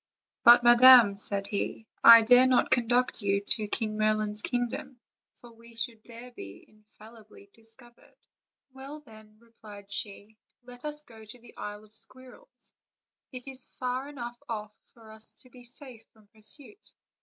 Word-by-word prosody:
"But, 240 Hz, +1 st, +7 dB
madam," 240 Hz, -3 st, +7 dB
said 200 Hz, -1 st, -4 dB
he, 205 Hz, +2 st, -5 dB, 0.2 s
"I 230 Hz, 0 st, +9 dB
dare 250 Hz, +3 st, +6 dB
not 255 Hz, -1 st, +1 dB
conduct 245 Hz, 0 st, +1 dB
you 200 Hz, -1 st, 0 dB
to 210 Hz, +1 st, +1 dB
King 215 Hz, 0 st, -1 dB
Merlin's 215 Hz, -1 st, -1 dB
kingdom, 245 Hz, +2 st, -4 dB, 0.4 s
for 240 Hz, -, -17 dB
we 230 Hz, 0 st, -18 dB
should 230 Hz, -1 st, -5 dB
there 240 Hz, +1 st, -12 dB
be 100 Hz, -, -12 dB
infallibly 215 Hz, -1 st, -19 dB
discovered." 230 Hz, +2 st, -17 dB, 0.6 s
"Well, 275 Hz, +3 st, -11 dB
then," 215 Hz, -5 st, -18 dB
replied 215 Hz, -3 st, -16 dB
she, 205 Hz, +1 st, -5 dB, 0.2 s
"let 245 Hz, +2 st, -14 dB
us 300 Hz, 0 st, -3 dB
go 225 Hz, -5 st, -16 dB
to 215 Hz, +3 st, -11 dB
the 240 Hz, -1 st, -19 dB
Isle 210 Hz, 0 st, -8 dB
of 215 Hz, 0 st, -23 dB
Squirrels; 260 Hz, -, -9 dB, 0.6 s
it 255 Hz, 0 st, -10 dB
is 265 Hz, -1 st, -2 dB
far 255 Hz, +2 st, -4 dB
enough 240 Hz, -4 st, -9 dB
off 210 Hz, -2 st, -6 dB, 0.2 s
for 225 Hz, -2 st, -16 dB
us 220 Hz, 0 st, -4 dB
to 255 Hz, -, -22 dB
be 245 Hz, 0 st, -16 dB
safe 250 Hz, -2 st, -13 dB
from 220 Hz, -1 st, -25 dB
pur 220 Hz, -, -23 dB
suit." 290 Hz, -, -3 dB
230 Hz, 155 wpm, -27 LUFS, 215-250 Hz, 0.6 s, I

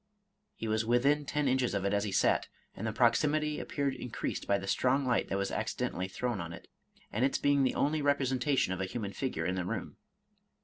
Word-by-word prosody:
He 115 Hz, -, -5 dB
was 110 Hz, 0 st, +1 dB
within 135 Hz, +6 st, +2 dB
ten 145 Hz, 0 st, 0 dB
inches 130 Hz, -4 st, +1 dB
of 100 Hz, -1 st, -1 dB
it 100 Hz, -, +1 dB
as 100 Hz, +1 st, +1 dB
he 100 Hz, -, -3 dB
sat, -, -, +2 dB, 0.3 s
and 110 Hz, -, -4 dB
the -, -, 0 dB
proximity 150 Hz, +6 st, +2 dB
ap -, -, -8 dB
peared 140 Hz, -2 st, 0 dB
increased 125 Hz, -, -4 dB
by 100 Hz, -, +3 dB
the 95 Hz, -, -6 dB
strong 130 Hz, +7 st, +2 dB
light 125 Hz, -1 st, +1 dB
that 95 Hz, -, 0 dB
was 100 Hz, 0 st, -1 dB
accidentally 90 Hz, +1 st, -2 dB
thrown 120 Hz, +1 st, -2 dB
on 85 Hz, 0 st, -6 dB
it, -, -, -11 dB, 0.4 s
and 115 Hz, -, 0 dB
its 135 Hz, -, +2 dB
being 145 Hz, -1 st, +3 dB
the 130 Hz, -, +2 dB
only 150 Hz, +2 st, +1 dB
representation 135 Hz, -5 st, +1 dB
of 95 Hz, -, -4 dB
a -, -, 0 dB
human 100 Hz, 0 st, -4 dB
figure 95 Hz, -9 st, -2 dB
in 90 Hz, -, 0 dB
the 90 Hz, 0 st, -1 dB
room. 90 Hz, -, -4 dB
125 Hz, 220 wpm, -31 LUFS, 100-140 Hz, 0.4 s, by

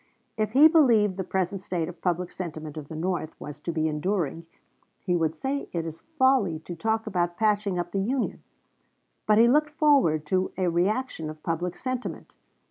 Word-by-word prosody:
If 215 Hz, -1 st, -1 dB
he 290 Hz, +4 st, +9 dB
believed 235 Hz, -, +4 dB
the 190 Hz, -, -1 dB
present 190 Hz, +1 st, -2 dB
state 175 Hz, -4 st, -2 dB
of 175 Hz, -1 st, -10 dB
public 180 Hz, 0 st, -1 dB
sentiment 155 Hz, -4 st, -6 dB
of 150 Hz, -2 st, -7 dB
the 160 Hz, -, -8 dB
North 170 Hz, -1 st, -3 dB
was 150 Hz, -1 st, -8 dB
to 170 Hz, -, -4 dB
be 160 Hz, -1 st, 0 dB
enduring, 165 Hz, 0 st, -2 dB, 0.5 s
he 180 Hz, -2 st, -1 dB
would 160 Hz, -2 st, 0 dB
say 270 Hz, -, -3 dB
it 165 Hz, -2 st, -2 dB
is 165 Hz, 0 st, -7 dB, 0.2 s
folly 260 Hz, -, +3 dB
to 175 Hz, +2 st, -7 dB
talk 220 Hz, +5 st, -1 dB
about 175 Hz, -4 st, -1 dB
patching 210 Hz, -3 st, +1 dB
up 175 Hz, 0 st, -3 dB
the 195 Hz, -, -1 dB
Union; 245 Hz, +6 st, -1 dB, 0.9 s
but 210 Hz, 0 st, +5 dB
he 230 Hz, +1 st, +7 dB
looked 300 Hz, +4 st, +3 dB
forward 280 Hz, -, +3 dB
to 185 Hz, +4 st, 0 dB
a 185 Hz, -1 st, +1 dB
reaction 180 Hz, -1 st, -1 dB
of 155 Hz, 0 st, -10 dB
public 175 Hz, +2 st, -2 dB
sentiment. 255 Hz, +3 st, -5 dB
180 Hz, 185 wpm, -26 LUFS, 165-220 Hz, 0.9 s, he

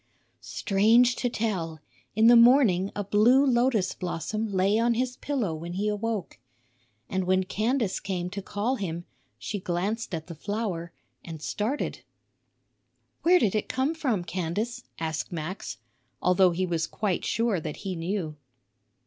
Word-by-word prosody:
Strange 230 Hz, +5 st, +3 dB
to 245 Hz, -, -1 dB
tell, 185 Hz, -9 st, -2 dB, 0.4 s
in 220 Hz, +1 st, +4 dB
the 240 Hz, +1 st, +8 dB
morning 235 Hz, -6 st, +5 dB
a 205 Hz, -, -2 dB
blue 230 Hz, +8 st, +4 dB
lotus 240 Hz, -6 st, +2 dB
blossom 205 Hz, +5 st, -3 dB
lay 195 Hz, +3 st, +2 dB
on 235 Hz, 0 st, +2 dB
his 250 Hz, +1 st, -1 dB
pillow 250 Hz, -, -1 dB
when 170 Hz, +2 st, -6 dB
he 200 Hz, +3 st, -1 dB
awoke. 210 Hz, -, -2 dB, 0.7 s
And 190 Hz, -1 st, -1 dB
when 185 Hz, +1 st, +3 dB
Candace 220 Hz, +2 st, 0 dB
came 180 Hz, -3 st, -3 dB
to 200 Hz, -, -4 dB
call 210 Hz, +7 st, -1 dB
him, 175 Hz, -4 st, -4 dB, 0.3 s
she 205 Hz, -, -4 dB
glanced 190 Hz, +3 st, -2 dB
at 160 Hz, -1 st, -6 dB
the 170 Hz, -, -8 dB
flower 175 Hz, -1 st, -3 dB, 0.3 s
and 165 Hz, -2 st, -8 dB
started. 220 Hz, -, -2 dB, 1.2 s
"Where 360 Hz, +2 st, +6 dB
did 215 Hz, -, +2 dB
it 215 Hz, -, -1 dB
come 265 Hz, +5 st, 0 dB
from, 255 Hz, -, -1 dB
Candace?" 185 Hz, +7 st, -3 dB
asked 160 Hz, -1 st, -3 dB
Max, 170 Hz, -, -5 dB, 0.4 s
although 180 Hz, 0 st, +4 dB
he 180 Hz, +2 st, -1 dB
was 165 Hz, -3 st, -1 dB
quite 200 Hz, -5 st, -2 dB
sure 225 Hz, -5 st, +1 dB
that 155 Hz, -1 st, -5 dB
he 190 Hz, -1 st, -2 dB
knew. 165 Hz, -2 st, -3 dB
200 Hz, 150 wpm, -27 LUFS, 175-230 Hz, 1.2 s, the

